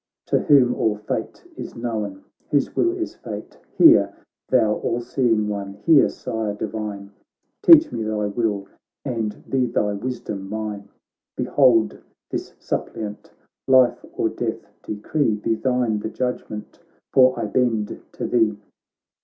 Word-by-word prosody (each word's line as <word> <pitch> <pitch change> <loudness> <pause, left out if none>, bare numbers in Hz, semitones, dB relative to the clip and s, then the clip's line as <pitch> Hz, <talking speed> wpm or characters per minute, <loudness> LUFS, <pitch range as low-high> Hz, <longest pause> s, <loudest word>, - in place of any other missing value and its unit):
To - - +3
whom 130 -4 +5
all 110 -3 +1
fate 105 - -4
is - - -8
known, 105 -5 -4 0.3
whose 145 -2 +1
will 350 +1 +1
is 335 - -3
fate; - - -8 0.2
Hear, 330 0 +7 0.4
thou 110 -4 +3
all 120 - -1
seeing 120 -3 +1
one, 100 -1 -4
hear. 155 -4 +6
Sire 110 -2 -4
divine, 105 -2 -5 0.5
Teach 325 -2 +8
me - - -3
thy 110 -1 -1
will, 100 -2 -1 0.4
and 110 -3 -3
be 130 -2 +1
thy 105 -3 0
wisdom 100 -3 -5
mine! 105 -2 -5 0.5
Behold 125 -5 +3 0.3
this - - -5
suppliant! 105 -1 -5 0.4
life 130 -2 +4
or - - 0
death - - -4 0.2
de - - -3
cree; 110 +2 0
Be 105 +2 -1
thine 120 -2 0
the 110 - -4
judgement, 125 -4 -4 0.3
for 130 -1 +5
I 115 - -1
bend 110 -1 0
to - - -4
thee.' 110 -3 +2
110 Hz, 135 wpm, -22 LUFS, 105-125 Hz, 0.5 s, Teach